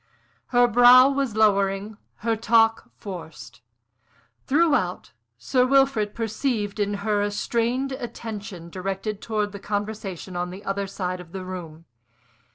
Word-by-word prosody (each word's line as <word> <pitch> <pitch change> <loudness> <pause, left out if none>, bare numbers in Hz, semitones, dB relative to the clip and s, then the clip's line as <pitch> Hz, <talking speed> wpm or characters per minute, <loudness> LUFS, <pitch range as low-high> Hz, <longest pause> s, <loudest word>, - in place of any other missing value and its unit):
Her 245 0 +4
brow 245 +3 +7
was 270 -5 -1
lowering, 200 -1 +2 0.3
her 230 -1 +2
talk 225 0 +2
forced. 160 - -9 0.9
Throughout, 280 - +1 0.3
Sir 250 - +1
Wilfrid 265 -5 +2
perceived 220 -2 -2
in 205 0 0
her 210 -1 +1
a 205 - 0
strained 235 +5 -1
attention 205 -8 -7
directed 195 +3 -4
towards 210 -2 -2
the 200 - -8
conversation 205 -3 -4
on 175 0 -2
the 190 +3 -10
other 195 0 -2
side 185 -2 -4
of 175 -1 -12
the 190 -1 -6
room. 165 -3 -8
205 Hz, 130 wpm, -24 LUFS, 190-235 Hz, 0.9 s, brow